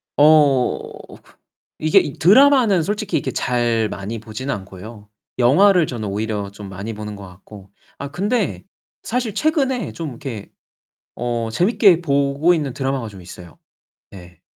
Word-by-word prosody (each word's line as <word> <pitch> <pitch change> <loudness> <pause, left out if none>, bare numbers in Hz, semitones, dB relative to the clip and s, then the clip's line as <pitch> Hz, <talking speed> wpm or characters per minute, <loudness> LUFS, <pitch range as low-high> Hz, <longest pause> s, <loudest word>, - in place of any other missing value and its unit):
어 145 -4 +4 1.0
이게 155 0 +4
이 140 - -3
드라마는 230 - +5
솔직히 210 +3 -2
이렇게 - - -3
잘 120 -3 0
많이 105 +3 -6
보지는 115 +5 -5
않고요. 100 +2 -11 0.3
영화를 175 +8 +5
저는 115 -5 -5
오히려 105 0 -3
좀 100 -1 -10
많이 100 +4 -6
보는 105 0 -7
것 100 -2 -10
같고 95 +2 -15 0.3
아 140 - -5
근데 205 +5 -2 0.4
사실 240 -2 -2
최근에 265 - 0
좀 165 -2 -5
이렇게 120 -5 -8 0.7
어 120 -1 -3
재미있게 185 - +3
보고 140 +3 +2
있는 145 -6 -3
드라마가 135 -3 -3
좀 100 -3 -12
있어요. 90 -3 -13 0.6
예. 90 -3 -14
130 Hz, 285 characters per minute, -20 LUFS, 105-175 Hz, 1.0 s, 드라마는